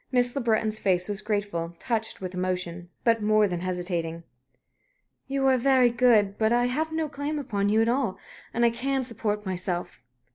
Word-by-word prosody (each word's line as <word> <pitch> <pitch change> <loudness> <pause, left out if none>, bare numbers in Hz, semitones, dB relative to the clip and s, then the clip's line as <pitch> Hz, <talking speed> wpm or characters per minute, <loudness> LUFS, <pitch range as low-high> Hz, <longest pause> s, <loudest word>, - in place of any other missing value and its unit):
Miss 245 0 +1
Le 275 - 0
Breton's 220 -2 +1
face 180 -2 +1
was 205 -1 -4
grateful, 205 -6 -2
touched 225 0 -1
with 185 -1 -5
emotion, 180 -1 -3
but 230 -2 +3
more 215 0 +4
than 175 -2 -3
hesitating. 175 -2 -3 1.0
"You 275 0 0
are 265 -1 +5
very 255 -1 +4
good. 225 -5 +3
But 220 0 +3
I 240 +1 +3
have 305 +6 -1
no 320 -1 -1
claim 290 +1 -4
upon 205 -8 -1
you 220 +2 +4
at - - 0
all. 235 -6 0 0.3
And 235 +1 +2
I 235 - +4
can 265 +3 -1
support 210 -3 -3
myself." 180 -1 -3
215 Hz, 180 wpm, -26 LUFS, 185-245 Hz, 1.0 s, are